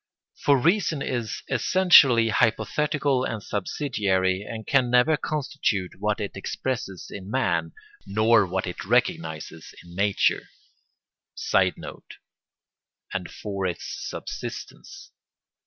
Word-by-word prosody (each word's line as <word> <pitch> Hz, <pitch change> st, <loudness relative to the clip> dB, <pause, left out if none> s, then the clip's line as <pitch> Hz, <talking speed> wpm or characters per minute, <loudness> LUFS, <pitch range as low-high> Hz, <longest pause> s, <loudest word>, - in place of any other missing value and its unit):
For 140 Hz, -1 st, +3 dB
reason 165 Hz, -2 st, +1 dB
is 120 Hz, -4 st, -3 dB
essentially 135 Hz, -5 st, +5 dB
hypothetical 135 Hz, +5 st, +1 dB
and 110 Hz, -5 st, -4 dB
subsidiary, 95 Hz, -4 st, -1 dB
and 110 Hz, +1 st, -7 dB
can 130 Hz, -3 st, +2 dB
never 125 Hz, +6 st, +4 dB
constitute 140 Hz, -11 st, -2 dB
what 105 Hz, +1 st, 0 dB
it 100 Hz, -2 st, -3 dB
expresses 100 Hz, -1 st, -4 dB
in 95 Hz, -1 st, -8 dB
man, 85 Hz, -10 st, 0 dB, 0.3 s
nor 110 Hz, +1 st, +4 dB
what 95 Hz, +1 st, -2 dB
it 90 Hz, -, -6 dB
recognises 80 Hz, -2 st, -1 dB
in 85 Hz, 0 st, -14 dB
nature. 100 Hz, +2 st, +1 dB, 0.9 s
[Sidenote: -, -, -1 dB, 1.0 s
and -, -, -3 dB
for 100 Hz, -2 st, -4 dB
its 90 Hz, -, -5 dB, 0.2 s
subsistence. 390 Hz, 0 st, -8 dB
110 Hz, 105 wpm, -25 LUFS, 95-135 Hz, 1.0 s, essentially